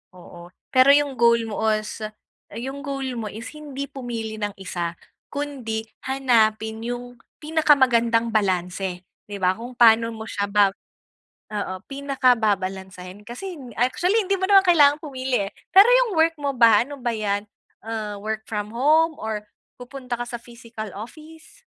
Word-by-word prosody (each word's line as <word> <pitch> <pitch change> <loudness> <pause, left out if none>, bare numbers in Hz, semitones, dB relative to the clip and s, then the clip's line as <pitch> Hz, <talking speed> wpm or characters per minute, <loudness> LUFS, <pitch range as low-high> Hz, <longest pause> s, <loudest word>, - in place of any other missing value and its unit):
Oo, 175 -1 -13 0.2
pero 260 +1 +6
'yong 285 -3 0
goal 235 -1 +4
mo 210 - -4
os 215 +1 -3 0.5
yung 270 +5 -6
goal 270 -3 -4
mo 220 - -4
is 225 +3 -8
hindi 280 -2 -6
pumili 230 -4 -5
ng 205 -1 -2
isa 175 -2 -4 0.4
kundi 265 -7 -3 0.2
hanapin 220 -5 +1
'yong 245 0 -6 0.2
pinakamagandang 255 -7 +3
balanse, 185 -2 -1 0.2
'di 205 -1 -6
ba, 185 0 +2
kung 240 +2 -9
pa'no 230 -1 +5
mo 220 - -7
siya 200 -2 -2
ba 200 -1 +4 0.8
oo. 200 -2 -3
Pinaka 275 -2 +2
babalansehin 190 -2 -3
kasi 350 +9 -7 0.2
actually, 355 - +2
hindi 390 +1 +1
mo - - 0
naman 390 -1 +7
kailangan 295 -4 +6
pumili, 260 -7 -2
eh. - - -23 0.2
Pero 390 +4 +8
'yong - - +4
work 325 0 +3
mo 280 -1 -1
ba 230 -3 +6
ano 285 +1 -9
ba 240 -1 -1
'yan, 205 -1 -2 0.4
ah, 215 -2 -4
work 220 +1 -4
from 210 -1 -3
home 310 +5 +3
or 215 -1 -4 0.4
pupunta 250 0 -6
ka - - -1
sa 240 - -5
physical 230 -3 -9
office? 320 - -12
235 Hz, 150 wpm, -23 LUFS, 210-280 Hz, 0.8 s, Pero